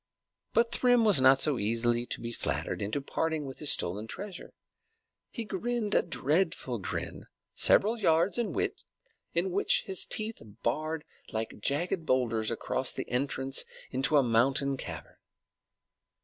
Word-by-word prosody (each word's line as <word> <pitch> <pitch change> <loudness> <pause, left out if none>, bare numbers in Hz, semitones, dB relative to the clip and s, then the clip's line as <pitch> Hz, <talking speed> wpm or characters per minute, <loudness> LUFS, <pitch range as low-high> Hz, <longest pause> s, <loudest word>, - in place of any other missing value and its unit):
But 230 0 +3
Thrym 245 -2 +3
was 200 -11 +6
not 130 +1 +6
so 150 -5 +1
easily 120 +3 0
to - - -2
be 115 0 -4
flattered - - -3
into 110 +8 -2
parting 160 +2 -2
with 135 -1 -8
his 150 - +5
stolen 100 +5 -1
treasure. 195 - -8 0.7
He 235 - -5
grinned 220 +1 -2
a - - +5
dreadful 160 - 0
grin, 95 - -5 0.3
several 225 +3 +4
yards 175 +3 +2
in 225 -6 -1
width, - - -2 0.5
which 185 +3 +2
his 190 -2 -3
teeth 220 +1 -3 0.2
barred 155 +6 -1 0.3
like 110 0 -4
jagged 165 - -1
boulders 115 -4 +1
across - - -2
the - - -5
entrance 135 +1 0 0.3
to 135 +4 +2
a 140 - +5
mountain 135 +4 +2
cavern. - - -8
150 Hz, 140 wpm, -30 LUFS, 125-190 Hz, 0.7 s, was